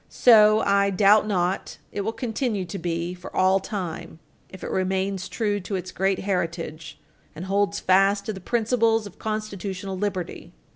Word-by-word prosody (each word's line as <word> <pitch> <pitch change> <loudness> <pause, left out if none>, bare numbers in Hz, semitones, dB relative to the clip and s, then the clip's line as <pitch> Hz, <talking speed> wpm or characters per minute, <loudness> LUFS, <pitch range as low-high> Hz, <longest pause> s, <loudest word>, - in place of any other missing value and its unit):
So, 215 -2 +6
I 200 0 +3
doubt 205 +2 +4
not, 185 -2 -1
it 205 - -3
will 215 +3 -1
continue 225 -4 -2
to 195 +2 -6
be 170 0 -2
for 180 0 -11
all 190 +1 +4
time 175 -5 -6 0.3
if 190 - -12
it - - -4
remains 190 0 -1
true 205 -3 -1
to 195 +1 -5
its 185 -1 -5
great 195 0 0
heritage 165 -4 -3 0.4
and 170 - -6
holds 200 +1 0
fast 195 +2 +3
to 215 - -3
the 190 - -8
principles 225 0 +1
of 205 - -12
constitutional 200 -3 -4
liberty. 185 -2 -4
195 Hz, 160 wpm, -24 LUFS, 185-210 Hz, 0.4 s, So